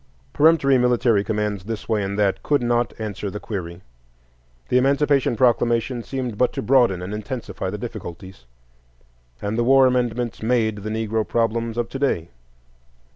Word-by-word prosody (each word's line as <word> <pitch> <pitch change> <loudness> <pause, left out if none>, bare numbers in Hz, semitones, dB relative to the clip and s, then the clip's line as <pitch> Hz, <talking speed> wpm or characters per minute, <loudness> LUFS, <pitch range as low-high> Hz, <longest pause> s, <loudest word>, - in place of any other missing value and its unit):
Peremptory 145 -4 +4
military 120 -4 +2
commands 105 -3 -2
this 110 0 -5
way 110 -2 +1
and 100 0 -3
that, 100 -2 +1
could 145 -4 +1
not 120 0 +1
answer 105 -2 -4
the 105 - -6
query; 90 -5 -6 0.9
the 125 - +4
Emancipation 140 -1 +2
Proclamation 120 +1 +1
seemed 125 -3 -5
but 125 - +3
to - - -4
broaden 120 -9 +3
and 95 +3 -5
intensify 105 -3 -5
the 105 - -4
difficulties; 95 - -8 1.0
and 105 +3 -2
the - - +3
War 135 +2 +6
Amendments 125 -2 0
made 110 -2 +1
the 105 +1 -6
Negro 110 0 -1
problems 115 0 -1
of 120 -1 -1
to 135 - -6
day. 85 - 0
115 Hz, 155 wpm, -22 LUFS, 105-125 Hz, 1.0 s, War